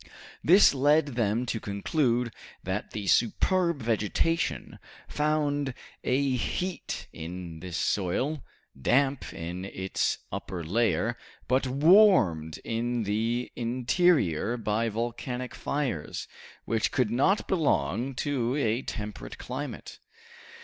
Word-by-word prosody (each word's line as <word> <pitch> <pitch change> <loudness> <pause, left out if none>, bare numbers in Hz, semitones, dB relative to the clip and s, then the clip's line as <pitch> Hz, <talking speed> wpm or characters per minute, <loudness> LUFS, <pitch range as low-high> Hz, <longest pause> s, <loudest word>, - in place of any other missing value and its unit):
This 185 +2 +7
led 145 +2 +3
them 115 -1 0
to 115 -1 -2
conclude 120 +4 0 0.3
that 95 +3 -3
the 105 -2 -5
superb 170 - +2
vegetation 115 +9 0 0.3
found 145 -3 0 0.3
a 135 +1 +1
heat 180 +9 -3
in 85 0 -7
this 90 0 -5
soil, 130 - 0 0.3
damp 135 - +1
in 85 +2 -5
its 95 -1 -1
upper 90 -3 -5
layer, 110 +4 +1 0.3
but 130 +1 +2
warmed 135 - +5
in 120 +1 -1
the 115 +4 -1
interior 120 - +2
by 110 +1 0
volcanic 120 +3 -4
fires, 130 - -3 0.4
which 115 0 0
could 125 -5 +1
not 145 - +2
belong 130 - 0
to 130 -2 -1
a 120 -4 +1
temperate 105 -4 -6
climate. 135 +4 -6
120 Hz, 105 wpm, -28 LUFS, 105-140 Hz, 0.4 s, This